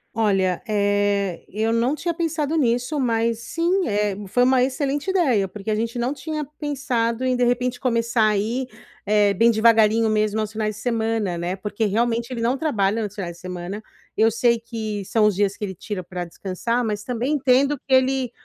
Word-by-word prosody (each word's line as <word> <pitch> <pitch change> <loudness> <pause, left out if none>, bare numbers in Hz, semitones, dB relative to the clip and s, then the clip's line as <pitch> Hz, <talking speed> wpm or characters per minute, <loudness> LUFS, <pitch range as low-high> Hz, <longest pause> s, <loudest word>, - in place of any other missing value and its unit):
Olha, 195 -5 +1
eh, 205 -3 0
eu 220 +3 -1
não 240 +5 +1
tinha 340 +3 -2
pensado 320 -2 -1
nisso, 250 +1 +1
mas, 230 -2 +1
sim, 340 +9 0
eh, 205 -2 0
foi 245 +6 +2
uma 255 0 +4
excelente 280 +4 -1
ideia, 265 - +2
porque 210 +2 -5
a - - +1
gente 230 +2 -2
não 245 +3 -1
tinha 305 0 -4
pensado 255 -5 -1
em, 255 0 +2
de 245 - +1
repente, 245 +1 0
começar 230 -3 +1
aí, 220 +5 0 0.4
eh, 205 -1 +4
bem 230 +5 +4
devagarinho 225 0 +4
mesmo, 215 0 +1
aos 215 -1 -2
finais 215 -1 -2
de 205 - -10
semana, 225 -5 0
né, 175 +2 -3
porque 210 +3 -3
realmente, 230 +3 0
ele 245 -3 -4
não 240 +3 +1
trabalha 225 -8 +1
nos 205 -1 -6
finais 175 -4 -5
de - - -17
semana, 185 +2 -6 0.3
eu 220 +1 +4
sei 235 +1 +2
que 220 -3 -5
são 215 +2 +2
os 210 - +4
dias 200 0 0
que 210 - -3
ele 190 - -5
tira 190 +1 -6
pra 180 0 -5
descansar, 200 +7 -2
mas 210 -1 -3
também 250 +4 -2
entendo 275 0 +3
que 275 - -14
ele 260 -1 +2
230 Hz, 190 wpm, -22 LUFS, 205-250 Hz, 0.4 s, uma